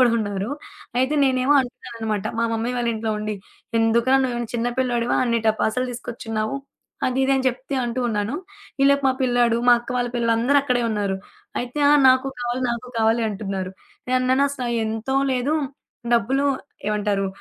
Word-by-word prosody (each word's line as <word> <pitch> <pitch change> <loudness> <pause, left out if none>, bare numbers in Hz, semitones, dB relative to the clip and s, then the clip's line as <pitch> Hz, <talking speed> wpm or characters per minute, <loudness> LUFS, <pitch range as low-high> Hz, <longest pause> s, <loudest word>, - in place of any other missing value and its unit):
కూడా 250 -2 +6
ఉన్నారు. 205 0 -2 0.5
అయితే, 260 +4 +2
నేనేమో 260 +1 +3
అంటున్నా 255 0 -7
అన్నమాట 220 -3 -2
మా 230 - +2
మమ్మీ 225 +2 -1
వాళ్ళ 240 -1 0
ఇంట్లో 220 0 -2
ఉండి, 215 0 -3 0.4
ఎందుకురా, 235 +3 +3
నువ్వే‌మైనా 240 -3 -2
చిన్న 235 0 0
పిల్లోడివా 245 -2 +1
అన్ని 235 -1 +1
టపాసులు 220 +3 +1
తీసుకొచ్చిన్నావు, 225 -1 -4 0.5
అది, 255 +1 -1
ఇది 275 - +2
అని 265 - -1
చెప్తే 255 +3 -5
అంటూ 240 +1 -2
ఉన్నాను. 210 +2 -1 0.5
ఈ - - +5
లోపు 280 0 +3
మా 260 - +3
పిల్లాడు 245 -2 +3
మా - - +9
అక్క 240 - -11
వాళ్ళ 245 0 0
పిల్లలు 230 -1 +2
అందరక్కడే 255 0 +2
ఉన్నారు. 205 -3 -1 0.4
అయితే, 250 +4 -5
"ఆ! - - +7 0.2
నాకు 260 +1 +4
కావాలి, 245 +1 -2
నాకు 235 +1 -4
కావాలి" 225 +1 +3
అంటున్నారు. 195 -3 -4 0.4
నేనన్నాను 255 +2 +3
అసలయి 250 -4 -3
ఎంతో 225 +4 -2 0.2
లేదు, 260 +4 0 0.6
డబ్బులు 255 +5 +2 0.4
ఏమంటారు 205 -2 0
240 Hz, 160 wpm, -23 LUFS, 220-255 Hz, 0.6 s, మా